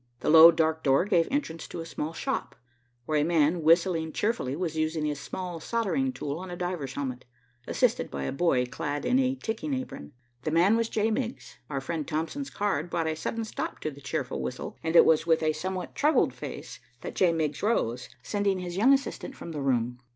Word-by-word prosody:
The - - +1
low, 165 +1 +11
dark 160 -1 +1
door 135 +5 +3
gave 175 -5 +3
entrance 165 - -2
to - - -7
a 165 - -5
small 160 -1 -4
shop, 165 - -3 0.5
where 155 +1 +1
a - - +2
man, 165 +1 +2
whistling 165 0 +3
cheerfully, 210 - -1
was 165 -1 -3
using 155 -1 0
a 150 - 0
small 175 +4 -6
soldering 235 - 0
tool 145 - -4
on 185 0 -7
a 175 - -5
diver's 175 -7 -3
helmet, 130 -3 -4 0.4
assisted - - +1
by 70 -1 -4
a 70 - -2
boy 135 -5 +2
clad 145 +3 -4
in 255 - +3
a 260 0 +2
ticking 265 +4 -3
apron. 255 - -7 0.3
The 155 - -2
man 175 +7 +4
was 230 0 0
J. 220 +1 +1
Miggs. 235 +1 -4
Our 135 -2 -2
friend 155 +2 -3
Thompson's 165 - -3
card 190 -6 -1
brought 165 -1 -1
a 160 0 -1
sudden 225 +8 -3
stop 220 - -5
to 155 - -2
the 140 0 -13
cheerful 65 - -3
whistle, 65 - -5
and 160 +1 -2
it - - +9
was 160 0 +3
with 160 -1 +3
a 155 0 +2
somewhat 185 +4 -4
troubled 300 +2 +3
face - - -8 0.2
that - - -6
J. 180 -2 +3
Miggs 155 -3 -1
rose, 125 - 0
sending 205 -2 0
his 180 -1 -5
young 250 +7 +6
assistant 275 0 -2
from 170 - -8
the 150 -3 -4
room. 125 -2 0
165 Hz, 210 wpm, -28 LUFS, 150-205 Hz, 0.5 s, low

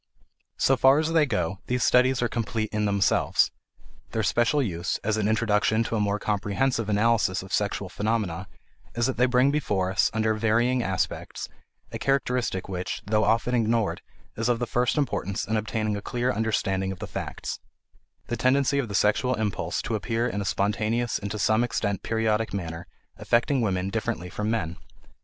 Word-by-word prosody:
So 135 - +3
far 135 +2 +6
as 160 +1 0
they 155 -3 +4
go, 95 -5 -1
these 125 -1 0
studies 125 +1 +4
are - - +2
complete 110 -2 -2
in 105 0 0
themselves; 100 -2 +2 0.6
their 110 - 0
special 120 +7 +2
use, 90 -9 -1
as 110 +1 +1
an 110 -1 0
introduction 110 0 +2
to 115 - -3
a - - 0
more 100 0 +1
comprehensive 105 +3 -1
analysis 105 -3 +2
of 95 - -10
sexual 100 -1 0
phenomena, 100 -3 -2 0.5
is 120 0 +1
that 130 -2 -1
they 125 +2 +4
bring 125 +2 +3
before 100 -11 0
us, 95 - +3
under 110 0 +1
varying 115 +3 +2
aspects, 95 -4 -3 0.4
a - - -5
characteristic 125 -7 0
which, 90 -2 -4
though 105 +1 +2
often 115 +3 +1
ignored, 115 -2 +1 0.3
is 115 +2 -1
of 120 - +2
the 120 - -2
first 125 +4 0
importance 115 -7 -1
in 110 - -1
obtaining 110 0 -1
a 100 - -4
clear 125 +4 -1
understanding 95 -3 0
of 95 - -6
the - - -6
facts: - - -5 0.7
the 120 - -3
tendency 140 +2 +2
of 130 - -1
the 100 - -5
sexual 115 +6 +2
impulse 110 -3 -2
to - - -3
appear 115 +2 0
in 105 -4 -2
a - - -4
spontaneous 110 +4 0
and 100 - -5
to 105 - -4
some 110 +2 +2
extent 100 -5 -1
periodic 110 -1 0
manner, 85 -2 -5 0.3
affecting 120 +3 +1
women 95 -3 -1
differently 110 -5 -3
from 105 +1 -2
men. 85 -7 -2
110 Hz, 180 wpm, -26 LUFS, 100-120 Hz, 0.7 s, far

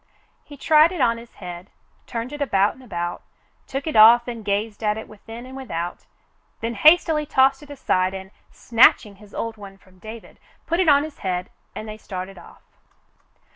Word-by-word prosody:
He 290 - -13
tried 310 +4 +5
it 360 - -6
on 230 -3 +2
his 235 0 -15
head, 180 0 -9 0.4
turned 235 +4 -5
it 295 - -7
about 200 -7 +2
and 265 - -18
about, 175 -7 -5 0.5
took 270 +1 -4
it 315 - -3
off 230 +3 +7
and 235 -2 -6
gazed 210 +2 -2
at 210 0 +1
it 220 - -7
within 225 +3 -11
and 260 +1 -11
without, 175 -10 -6 0.5
then 230 +1 -3
hastily 310 +4 +4
tossed 270 +1 +3
it 295 - -14
aside 190 -9 0
and, 190 0 -9 0.2
snatching 225 -3 +3
his 210 0 -17
old 230 -1 -4
one 195 -2 -11
from 185 -1 -24
David 220 +3 -11 0.3
put 335 - -1
it 365 -4 +3
on 285 0 +5
his 310 -1 -9
head, 180 -1 -3 0.2
and 215 - -7
they 215 0 -7
started 185 -1 -7
off. - - -17
225 Hz, 185 wpm, -22 LUFS, 195-270 Hz, 0.5 s, off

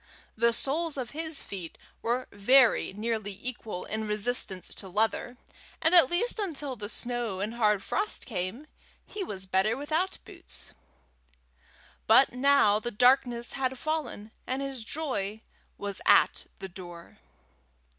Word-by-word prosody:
The 235 +1 +3
soles 295 +6 0
of 250 -3 -4
his 315 0 -3
feet 180 -5 -7 0.2
were 245 +2 -1
very 245 +5 +4
nearly 210 -1 -3
equal 225 -6 -5
in 220 0 -3
resistance 210 -3 0
to 190 - -9
leather, 225 +5 0 0.4
and 320 - +2
at 340 -7 +8
least 440 +7 +1
until 295 -9 -3
the 205 -3 -6
snow 240 -5 -2
and 210 +3 -2
hard 210 -4 +2
frost 415 +2 -1
came, 205 +5 -4 0.4
he 415 - -5
was 190 - -6
better 190 +5 +1
without 315 +6 -1
boots. - - -6 1.4
But 235 +5 +6
now 250 -5 +4
the 240 - -3
darkness 245 0 +3
had 265 -1 -1
fallen, 300 -8 -3 0.2
and 260 +2 -2
his 270 -4 -5
joy 220 -7 -3 0.4
was 200 -1 -4
at - - +4
the 190 - -6
door. 175 - -11
235 Hz, 135 wpm, -28 LUFS, 205-275 Hz, 1.4 s, at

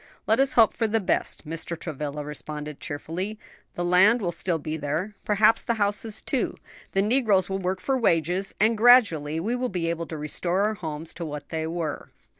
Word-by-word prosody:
"Let 220 - +2
us 270 0 +4
hope 225 -3 +5
for 225 - 0
the 225 +1 +1
best," 185 - -1
Mr. 165 +1 -4
Travilla 150 -2 -5
responded 150 0 -5
cheerfully; 175 +8 -5 0.4
"the 175 - -2
land 190 +7 +5
will 180 -6 -1
still 170 +1 -1
be 155 0 -4
there, 160 +7 -3
perhaps 215 +2 +4
the 235 - -1
houses 210 +1 -2
too; - - -1 0.4
the 195 - +2
negroes 210 -5 +2
will 195 - -1
work 185 0 -2
for 265 +8 0
wages, 180 - +1
and 220 +3 +4
gradually 205 - +5
we 220 +8 -1
may 250 0 -1
be 175 -5 -1
able 170 0 -4
to 160 - -6
restore 170 +5 -1
our 210 +1 +2
homes 160 -4 -6
to 170 - -6
what 150 -2 -6
they 160 0 -2
were." 165 -2 -4
180 Hz, 195 wpm, -25 LUFS, 160-215 Hz, 0.4 s, hope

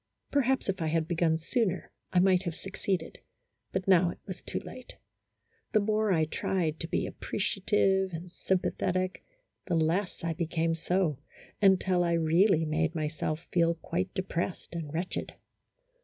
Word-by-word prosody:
Perhaps 265 -2 +2
if 190 -2 -1
I 160 - 0
had 160 0 +1
begun 165 -2 +2
sooner 185 0 -1 0.2
I - - 0
might 185 0 +5
have 170 -4 -4
succeeded, 190 -3 -3 0.5
but 190 0 -2
now 180 -2 +5
it - - -6
was 185 -2 -7
too - - -5
late. 255 - -10 0.8
The 215 - +6
more 215 0 +1
I 160 -3 +3
tried 160 0 -1
to 165 - -3
be - - -1
appre - - -6
ciative 195 -1 +2
and 170 +1 -7
sympathetic, 185 0 -1 0.4
the 175 - +1
less 165 +4 0
I 165 0 0
became 165 0 0
so, 165 -3 0 0.4
until 190 -2 +4
I 170 -1 +1
really 165 +1 +4
made 160 +1 0
myself 155 +1 -2
feel 170 -1 +3
quite 95 - -3
depressed 180 -1 -3
and 165 -4 -4
wretched. 170 +4 -3
175 Hz, 155 wpm, -30 LUFS, 165-190 Hz, 0.8 s, The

